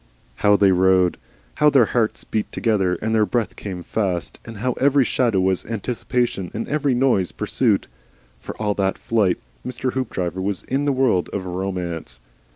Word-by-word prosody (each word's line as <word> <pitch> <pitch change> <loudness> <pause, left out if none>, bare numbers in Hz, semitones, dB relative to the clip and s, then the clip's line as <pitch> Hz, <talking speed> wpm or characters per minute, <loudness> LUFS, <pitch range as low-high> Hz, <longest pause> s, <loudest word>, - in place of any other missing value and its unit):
How 105 0 +4
they 100 -1 +5
rode! 95 -1 +3 0.4
How 150 - +5
their 135 -5 +5
hearts 115 -3 0
beat 110 - -3
together 95 -6 +1
and 110 +1 0
their 110 -1 +4
breath 120 -3 -1
came 90 -4 -6
fast, 95 -5 -2
and 115 -2 -9
how 125 +4 -1
every 140 0 +4
shadow 115 -5 +1
was 95 0 +1
anticipation 115 -2 -2
and 115 - -3
every 145 -3 +1
noise 120 -8 +2
pursuit! - - +1 0.5
For - - -8
all 105 -1 0
that 95 -1 0
flight 105 -6 +1 0.3
Mr. 130 0 -3
Hoopdriver 95 -8 -2
was 100 -1 -2
in 135 +3 -1
the 145 - +2
world 130 -9 +2
of 95 -2 -3
Romance. 90 -8 -4
105 Hz, 165 wpm, -22 LUFS, 95-125 Hz, 0.5 s, they